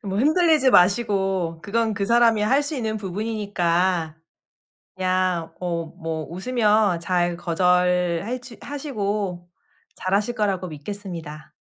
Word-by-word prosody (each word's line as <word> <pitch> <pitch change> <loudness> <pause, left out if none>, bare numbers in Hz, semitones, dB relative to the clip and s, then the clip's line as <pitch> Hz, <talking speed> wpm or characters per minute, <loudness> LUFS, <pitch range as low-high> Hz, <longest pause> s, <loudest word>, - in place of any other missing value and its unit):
뭐 195 -1 -3
흔들리지 310 -1 +4
마시고 190 -4 +2
그건 220 +3 0
그 200 -1 -1
사람이 230 -1 +4
할 270 +7 +3
수 290 +1 -3
있는 220 -3 -2
부분이니까 185 -5 -1 0.8
그냥 185 -2 0
어 170 -2 -2
뭐 160 -1 -4
웃으며 210 -1 +2
잘 175 -1 0
거절해주 180 +7 0
하시고 205 - -3 0.5
잘 185 - -3
하실 210 +4 0
거라고 195 -5 -1
믿겠습니다. 160 -2 -8
195 Hz, 250 characters per minute, -23 LUFS, 175-220 Hz, 0.8 s, 흔들리지